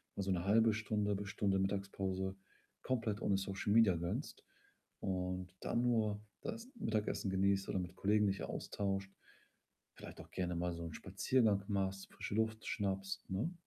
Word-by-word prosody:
mal 100 - -1
so 95 - 0
'ne 90 -2 +1
1/2 110 +2 +5
Stunde 105 -1 0
bis 100 0 -4
Stunde 100 -1 +1
Mittagspause, 95 -1 -1 0.5
komplett 115 -4 0
ohne 100 - +3
Social 95 +1 -1
Media 110 -5 +6
gönnst, 85 +1 -3 0.6
und 90 -1 -2
dann 120 - +1
nur 110 -4 +2 0.2
das 230 +1 -5
Mittagessen 110 - 0
genießt 95 0 +2
oder - - 0
mit 90 0 -5
Kollegen 105 +2 +3
dich 100 0 0
austauscht, 95 -1 -2 0.8
vielleicht - - -10
auch - - -15
gerne 90 -1 -1
mal 90 +1 0
so 85 0 -5
'n 80 - -6
Spaziergang 100 +1 +2
machst, 95 -1 -1
frische - - -5
Luft 110 0 0
schnappst, 95 -2 -2
ne? 105 - -1
100 Hz, 160 wpm, -37 LUFS, 95-110 Hz, 0.8 s, Media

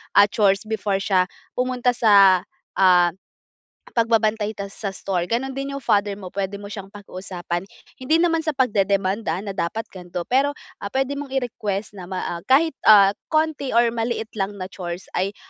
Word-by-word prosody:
ah, 205 - +8
chores 195 -1 +2
before 205 -3 -1
siya 190 -2 +2 0.3
pumunta 250 0 +1
sa, 200 -6 +6 0.3
ah, 180 -2 +5 0.8
pagbabantay 220 -2 +1
ta 200 0 -6
sa 200 - -6
store. 180 -3 -2
Gano'n 250 +5 -1
din 275 +1 -4
'yong 275 - -7
father 205 -3 +1
mo, 190 -3 -9
puwede 200 0 -3
mo 205 0 -9
siyang 195 -2 -7
pakiusapan. 185 -3 -6 0.3
Hindi 315 +6 +2
naman 330 -1 +2
sa 310 -2 -2
pagdedemand 200 -4 +1
ha 190 - -1
na 200 - -4
dapat 195 +4 -2
gan'to. 180 -1 -6
Pero, 280 +2 +2 0.2
ah, 200 - -4
puwede 270 +4 -1
mong 290 - -5
i-request 215 -6 -3
na 175 - -8
ma 185 -1 -4
ah, 170 - -4
kahit, 310 +5 +4 0.2
ah, 200 -2 +8 0.2
konti 310 -5 0
or 235 0 +4
maliit 230 -1 -3
lang 195 +1 -2
na 190 -1 -7
chores 175 -1 -7
ay 195 +2 -1
205 Hz, 175 wpm, -22 LUFS, 195-245 Hz, 0.8 s, ah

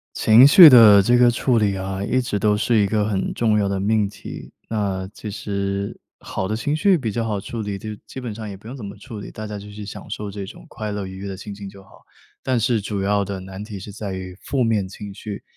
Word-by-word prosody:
情 115 +5 +7
绪 175 +2 +10
的 115 -6 +9
这 120 +5 +3
个 120 0 +6
处 120 +1 +1
理 105 -3 +2
啊， 95 +1 -4
一 130 +5 +1
直 120 -5 -2
都 105 0 +2
是 110 +2 +1
一 100 - +3
个 105 +1 0
很 95 -3 -1
重 110 -2 +1
要 100 - +1
的 100 -1 -1
命 105 +1 +2
题， 100 - -10 0.2
那 100 -4 -2
其 105 - -7
实 100 -1 -3 0.2
好 95 - -4
的 105 - -2
情 145 +7 -1
绪 185 +3 +3
比 120 -6 -3
较 115 +3 -2
好 105 -2 -2
处 115 +3 -6
理， 100 -1 -4
就 110 - -8 0.2
基 130 - -8
本 115 -4 -5
上 110 0 -7
也 100 - -7
不 95 +3 -14
用 135 - -7
怎 115 - -8
么 100 0 -7
处 110 -1 -9
理， - - -9
大 110 - -7
家 105 -1 -6
就 105 +1 -10
去 105 0 -8
享 - - -9
受 105 -1 -5
这 100 0 -6
种 95 - -12
快 105 -2 -5
乐 100 -1 -4
愉 95 0 -9
悦 100 +1 -6
的 95 - -5
心 100 +1 -8
情 100 0 -9
就 100 0 -12
好。 90 - -20 0.4
但 130 -3 0
是 115 0 +1
主 100 0 -3
要 100 +1 +1
的 100 -1 -5
难 95 +2 -8
题 105 -2 -8
是 100 - -9
在 100 -1 -6
于 95 -1 -6
负 135 -2 -1
面 110 -5 +1
情 100 +1 -9
绪， 105 0 -7
105 Hz, 285 characters per minute, -21 LUFS, 100-115 Hz, 0.4 s, 绪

